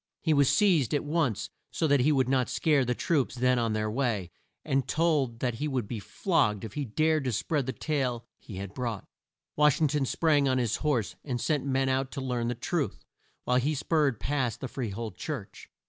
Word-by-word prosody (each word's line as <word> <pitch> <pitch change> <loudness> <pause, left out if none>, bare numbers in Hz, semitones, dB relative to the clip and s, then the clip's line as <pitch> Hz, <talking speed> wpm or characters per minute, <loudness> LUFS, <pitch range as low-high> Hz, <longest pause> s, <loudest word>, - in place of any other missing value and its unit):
He 160 - +3
was 140 -2 +4
seized 170 - +3
at 145 - 0
once 150 - -1 0.2
so - - -1
that 145 -2 +4
he 140 +5 +3
would 130 -4 +2
not 130 -2 +1
scare 150 -4 +2
the 125 0 -1
troops 140 -4 0
then 125 0 +2
on 115 -2 0
their 110 0 0
way, 110 -8 -1 0.3
and 135 -3 0
told 145 -8 +1
that 125 -2 0
he 145 +7 -3
would 130 -7 -2
be 115 - -4
flogged 105 0 0
if 110 - -7
he 145 -2 -2
dared 155 +6 +1
to 130 - 0
spread 135 +5 -1
the - - 0
tale 130 -6 -2
he 105 - -10
had 100 +1 -6
brought. 115 -5 -4 0.5
Wash 150 +1 +4
ing 155 -2 +3
ton 145 -1 0
sprang 150 -2 +2
on 130 -1 +2
his 120 -4 0
horse, 135 -9 0
and 125 -4 -3
sent 145 +1 0
men 135 0 +1
out 130 0 0
to 140 - -4
learn 125 -3 -2
the 120 - -1
truth, 145 +5 -2 0.4
while 125 - +2
he 145 +5 +1
spurred 145 -5 +1
past 130 -5 -1
the 130 - -4
Free 125 -3 -4
hold 105 -1 -6
church. 150 - -6
130 Hz, 215 wpm, -28 LUFS, 120-150 Hz, 0.5 s, was